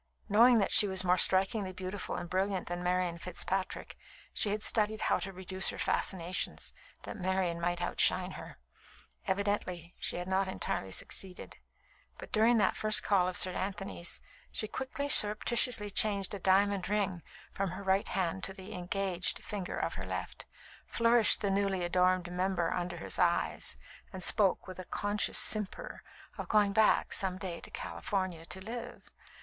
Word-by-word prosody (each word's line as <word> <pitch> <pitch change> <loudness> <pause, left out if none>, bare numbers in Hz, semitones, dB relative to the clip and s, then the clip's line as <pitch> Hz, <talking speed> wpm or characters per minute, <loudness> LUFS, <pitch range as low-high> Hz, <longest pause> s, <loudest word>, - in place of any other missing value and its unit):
Knowing 235 +4 +6
that 200 - +1
she 210 - +6
was 190 -1 -1
more 180 0 +3
strikingly 190 +2 +3
beautiful 185 +1 -5
and 175 -1 -5
brilliant 190 +1 -1
than 175 0 -4
Marian 180 -1 -1
Fitzpatrick, 185 +2 -3 0.4
she 210 - 0
had 210 +1 -2
studied 215 -1 +2
how - - +1
to 195 - -5
reduce 185 0 -1
her - - -5
fascinations, 180 -1 -1 0.3
that - - -7
Marian 185 -2 -1
might 175 0 -1
outshine - - +2
her. - - -10 0.7
Evidently 190 -3 -2
she - - -1
had 180 +1 -4
not 190 +1 +1
entirely 95 - -3
succeeded; 185 - -2 0.6
but - - -11
during 230 +2 +4
that 210 - +2
first 215 0 +5
call 190 -3 +2
of 185 - -1
Sir 185 - +3
Anthony's, 195 -2 -3 0.3
she 215 - -1
quickly, 265 +5 -4
surreptitiously 215 -2 +3
changed 200 -1 +1
a 200 - -4
diamond 195 0 +2
ring 200 -4 -1 0.3
from 195 -1 -2
her 185 +3 -7
right 195 +1 +1
hand 185 0 -2
to 190 - -3
the 190 -1 -9
"engaged" 180 0 -1
finger 195 -3 -5
of - - -2
her - - -6
left, - - -5 0.4
flourished 230 -1 +4
the 200 -2 0
newly 195 -2 0
adorned 180 0 +1
member 180 -2 -1
under 175 0 -3
his 165 - -3
eyes, 175 -2 0 0.3
and 185 -1 -5
spoke, 200 -1 +3
with 185 -1 -9
a 185 - -7
conscious 205 +3 0
simper, 215 - 0 0.4
of - - -6
"going 205 -2 +3
back 220 +1 +3
some 185 -1 +1
day 185 -3 -5
to - - -8
California 185 -5 -4
to 190 - -7
live." 235 +5 -8
190 Hz, 165 wpm, -31 LUFS, 180-205 Hz, 0.7 s, Knowing